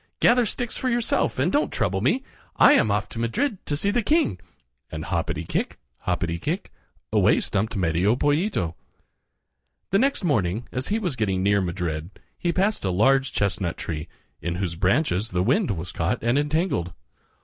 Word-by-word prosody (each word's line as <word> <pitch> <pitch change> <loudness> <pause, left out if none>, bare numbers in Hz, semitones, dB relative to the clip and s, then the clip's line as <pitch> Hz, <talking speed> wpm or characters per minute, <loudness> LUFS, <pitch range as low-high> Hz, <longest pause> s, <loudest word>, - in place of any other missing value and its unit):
Gather 240 -1 +4
sticks 245 +2 -3
for 255 - -1
yourself 240 -1 0
and 145 +8 +1
don't 295 - +1
trouble 95 0 0
me. 235 - +1 0.3
I - - +7
am 110 - +4
off 105 0 0
to 115 - -7
Madrid 185 - -1
to 145 - 0
see 200 +6 +1
the 240 +3 +1
king," 265 - +1 0.5
and 80 0 -5
hoppity 85 -1 -2
kick, - - -2 0.3
hoppity 85 -2 -1
kick, 170 - -3 0.4
away - - +4
stumped 110 +3 -1
Medio 90 +4 +2
Pollito. 145 - 0 1.2
The 195 - +4
next 275 -2 +1
morning, 110 - 0
as 130 +1 -2
he 210 - 0
was 180 -10 -2
getting 95 -5 0
near 100 0 +3
Madrid, 85 -3 -3 0.3
he 175 - -1
passed 195 +5 0
a 95 - 0
large 135 +9 +3
chestnut 95 -3 -1
tree, 75 -1 -4 0.3
in 85 0 -2
whose 90 -2 -2
branches 100 - +1
the 90 -3 0
wind 145 - +2
was 90 -2 -3
caught 85 +1 -1
and 120 +2 +2
entangled. 145 - 0
110 Hz, 170 wpm, -24 LUFS, -, 1.2 s, I